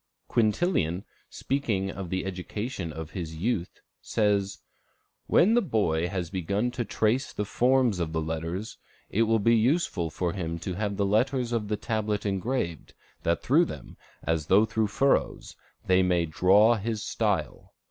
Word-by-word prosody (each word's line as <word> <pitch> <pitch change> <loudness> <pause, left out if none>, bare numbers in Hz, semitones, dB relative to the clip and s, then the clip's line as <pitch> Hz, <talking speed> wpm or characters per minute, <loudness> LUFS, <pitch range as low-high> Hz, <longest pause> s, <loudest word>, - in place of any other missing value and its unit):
Quintilian, 105 - +1 0.2
speaking 110 -8 -1
of 95 -3 -6
the 95 +1 -2
education 95 0 -4
of 80 0 -8
youth, 85 +3 -3 0.2
says, 100 -3 0 0.7
"When 205 +6 +5
the 240 - +4
boy 105 - 0
has 90 -3 -4
begun 100 +6 -1
to 120 - -2
trace 115 +5 0
the 105 - -3
forms 125 -1 +2
of 85 -2 -2
the 80 - -1
letters, 80 +6 -4 0.3
it 110 - +1
will 115 - +4
be 115 +2 +3
useful 115 - +1
for 85 +2 -2
him 85 -4 -3
to 85 +3 -4
have 100 +1 -2
the 100 - +1
letters 120 +4 +1
of 115 -3 -1
the 105 0 -1
tablet 110 -3 -2
engraved, 95 - -2 0.3
that 85 0 0
through 160 +7 +4
them, - - -9 0.3
as 80 -2 0
through 110 +2 +3
furrows, 135 +6 0 0.3
he 95 0 +5
may 90 -2 +2
draw 95 +8 +5
his 110 +1 -3
style. - - -2
100 Hz, 150 wpm, -27 LUFS, 90-115 Hz, 0.7 s, When